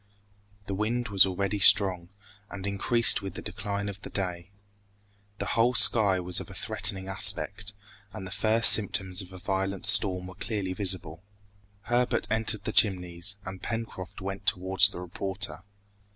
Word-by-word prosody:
The 100 - -6
wind 110 +4 -3
was 100 -1 +4
already 100 +2 -4
strong, 95 -3 +4 0.4
and 100 -1 -8
increased 115 +5 +3
with 100 -1 -9
the - - -7
decline 100 -1 -6
of 100 -1 -8
day. 90 -3 -6 0.9
The 100 - -5
whole 120 +2 +1
sky 105 -4 +4
was 90 0 -2
of - - -10
a 100 - -12
threatening 100 -2 0
aspect, 100 +1 +2 0.4
and 95 0 -10
the 90 - -10
first 110 +3 +4
symptoms 95 -2 +1
of 95 -1 -12
a 95 - -11
violent 95 +1 -4
storm 95 -4 +5
were 95 - -11
clearly 100 -1 -5
visible. 90 -4 -1 0.6
Herbert 120 +2 -1
entered 110 -2 -1
the 110 - -5
Chimneys, 90 -1 0
and 95 0 -9
Pencroft 115 -6 -7
went 95 +1 -8
towards 95 +2 +3
the 95 - -10
reporter. 95 -1 -4
95 Hz, 150 wpm, -26 LUFS, 95-105 Hz, 0.9 s, storm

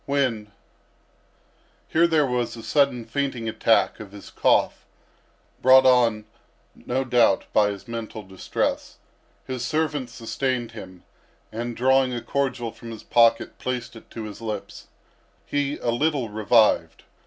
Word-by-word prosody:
When—" 125 -7 -1 1.4
Here 170 +1 +4
there 160 -3 +3
was 125 -2 -2
a 115 - -9
sudden 130 -2 +1
fainting 125 -1 -3
attack 110 0 +2
of 105 -2 -10
his 100 - -11
cough, - - +1 0.8
brought 130 +1 +7
on, 120 -4 +3 0.5
no 130 +2 -3
doubt, 120 -6 +3
by 105 -1 +4
his 100 +3 -8
mental 115 -2 -6
distress. 95 -1 -3 0.5
His 130 -2 -4
servant 150 -1 -1
sustained 120 +1 -3
him, 95 -5 -11 0.5
and 120 +1 -5
drawing 130 0 +3
a 120 - -4
cordial 130 -4 -2
from 115 +2 -11
his 115 -2 -9
pocket 115 -1 +2
placed 125 -2 -4
it 115 - -14
to 115 - -7
his 105 +1 -9
lips. 105 -3 -6 0.6
He 145 0 -1
a 120 - -1
little 135 -1 0
revived. 110 +1 +2
120 Hz, 135 wpm, -24 LUFS, 110-130 Hz, 1.4 s, brought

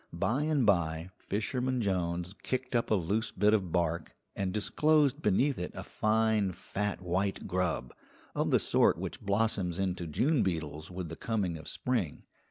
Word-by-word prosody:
By 125 +6 0
and 150 -4 +2
by 85 -3 +1
Fisherman 125 +5 -1
Jones 90 -3 -1
kicked 130 -1 -2
up 120 - +1
a 110 - +4
loose 100 +5 0
bit 105 +3 +3
of 95 -6 +1
bark, 85 -2 -1 0.2
and 95 -2 -1
disclosed 145 +7 +2
beneath 130 +6 +2
it 90 - -3
a - - -5
fine 110 -3 +1
fat 100 +1 -3
white 95 +3 -1
grub, 90 -9 -1 0.4
of - - 0
the - - +5
sort - - +3
which - - -5
blossoms 100 -4 +1
into 90 -3 -1
June 130 - +2
beetles 80 -3 -2
with 90 -2 -5
the - - -6
coming 100 -7 -1
of 80 -2 -9
spring. 115 - -2
100 Hz, 165 wpm, -31 LUFS, 90-115 Hz, 0.4 s, the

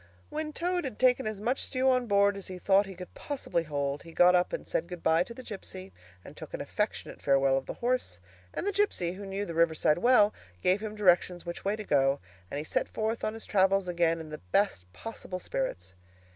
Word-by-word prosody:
When 310 0 -3
Toad 355 +3 -1
had 260 -6 -5
taken 255 -1 +3
as 215 -2 -4
much 245 +6 0
stew 260 0 0
on 250 -1 +1
board 200 -1 +4
as 195 - -7
he 185 - -6
thought 195 +2 +3
he 190 - -8
could 180 0 -10
possibly 275 - -2
hold, 145 -2 -2
he 165 - -12
got 180 +2 +6
up 180 0 +3
and - - -5
said 165 - -1
good 175 -1 -8
bye 160 +1 +4
to 185 - -3
the 255 - -9
gipsy, 95 - -7 0.3
and - - -11
took - - -7
an - - -6
affectionate - - -3
farewell 135 -1 +3
of 135 0 -2
the - - -5
horse; 240 - -1 0.3
and - - -4
the 405 - +1
gipsy, 395 - +1
who 195 +2 -8
knew 195 +1 -3
the 170 - -5
riverside 160 -1 +3
well, 215 -2 +5 0.3
gave 185 +3 +3
him 215 -1 -5
directions 180 -3 +3
which 170 0 -6
way 200 +2 +1
to 215 - -6
go, 135 -5 +2 0.3
and - - -4
he 145 - -2
set - - -1
forth 220 +1 -2
on 215 - -1
his 225 - -7
travels 195 -1 +3
again 170 -1 +1
in 160 -1 -8
the 150 - -6
best 90 - +1
possible 185 - -7
spirits. 95 - -4
190 Hz, 225 wpm, -29 LUFS, 165-220 Hz, 0.3 s, got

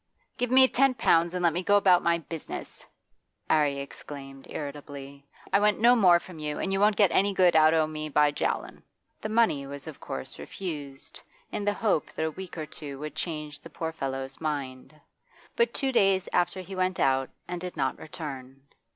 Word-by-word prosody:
'Give 245 - -1
me 260 +1 +7
ten 270 0 +3
pounds 170 -6 +3
and 180 - -2
let 170 -2 +4
me 175 - -1
go 205 +2 +4
about 185 -3 +5
my 170 0 +2
business,' 165 -1 -8 0.6
'Arry 145 -3 +3
exclaimed 140 -1 -9
irritably. 140 -1 -7 0.3
'I 200 - +6
want 210 0 +2
no 240 +2 +6
more 180 -7 +6
from 175 -2 -12
you, 150 -1 -3
and 195 - -2
you 195 - +1
won't 210 +1 +4
get 200 -4 +4
any 200 +1 +2
good 180 -3 +4
out 155 0 +6
o' 160 -1 +3
me 155 0 -5
by 150 0 +4
jawin'.' - - -2 0.4
The 215 - -3
money 215 -12 +2
was 140 0 -8
of 155 -3 -9
course 65 - -7
refused, 145 -7 -7 0.3
in 205 - -3
the 205 - +2
hope 205 -8 0
that 160 - -2
a 160 - -1
week 185 +2 -9
or 155 - -3
two 150 -2 -8
would 150 +2 -6
change 150 -4 -4
the 165 - -12
poor 160 +1 -4
fellow's 135 -2 -5
mind. 140 -1 -4 0.6
But 470 0 +2
two 270 -2 -1
days 195 -6 +3
after 175 +2 +1
he 190 +1 -8
went 185 0 0
out 135 0 +2 0.2
and 175 -1 -5
did 180 -1 -6
not 130 -1 -1
return. 135 -4 -8
160 Hz, 195 wpm, -27 LUFS, 145-190 Hz, 0.6 s, me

